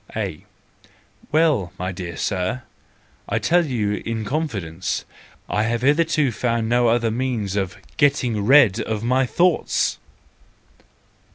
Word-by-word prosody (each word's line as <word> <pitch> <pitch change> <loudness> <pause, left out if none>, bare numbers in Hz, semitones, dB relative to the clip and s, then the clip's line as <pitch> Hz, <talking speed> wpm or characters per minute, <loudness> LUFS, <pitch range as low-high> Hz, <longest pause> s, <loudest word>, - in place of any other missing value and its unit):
A: - - -4 0.9
Well, 150 - +2
my 90 +1 -3
dear 90 -2 -7
Sir, 95 +6 -2 0.7
to - - +1
tell 175 -1 +2
you 105 -6 -1
in 115 -1 -3
con¬ 155 +7 -1
fidence, 90 - -4 0.4
I 105 - 0
have 115 +2 -1
hitherto 150 -1 +2
found 115 0 -1
no 120 +1 +3
other 115 -1 +2
means 115 -5 -2
of 95 -3 -2 0.2
getting 125 -7 +2
rid 120 -3 +6
of 110 0 -3
my 130 +2 +2
thoughts. 175 +8 +1
115 Hz, 125 wpm, -22 LUFS, 105-135 Hz, 0.9 s, rid